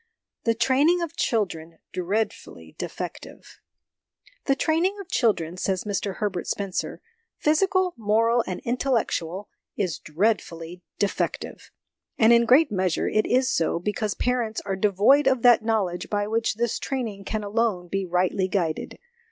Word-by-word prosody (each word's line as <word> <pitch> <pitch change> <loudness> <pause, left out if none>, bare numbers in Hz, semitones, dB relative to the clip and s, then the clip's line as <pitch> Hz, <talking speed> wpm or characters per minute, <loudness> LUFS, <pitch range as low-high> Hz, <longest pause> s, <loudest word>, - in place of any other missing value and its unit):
The 230 -1 +2
Training 285 +9 +3
of 335 - -6
Children 170 -8 -1 0.2
'dreadfully 195 +5 -3
de - - -2
fective.' - - -9 0.9
"The 275 - +3
training 340 +8 +1
of 395 - -8
children," 180 - +1
says 185 0 -1
Mr 200 -1 -2
Herbert 195 -4 -3
Spencer 195 -2 -3 0.3
"physical, 370 +4 +2
moral, 230 +2 +2
and 185 - -4
intellectual 230 -7 -1 0.3
is 185 -7 -1
dreadfully 170 -1 -2 0.2
defective. 205 - -2 0.5
And 225 +1 +6
in 235 0 +5
great 270 +5 +5
measure 185 -4 0
it 215 - +1
is 255 +1 +2
so, 165 - +1
because 210 +4 -2
parents 240 -3 -1
are 195 -1 -1
devoid 210 +9 +4
of 260 -3 +2
that 240 -3 +6
knowledge 205 -6 -1
by 205 -1 0
which 225 +1 0
this 235 0 -1
training 225 -7 -4
can 215 +1 -3
alone 205 -4 0
be 195 +2 -2
rightly 180 +2 +1
guided. 175 -5 -2
215 Hz, 140 wpm, -25 LUFS, 185-245 Hz, 0.9 s, And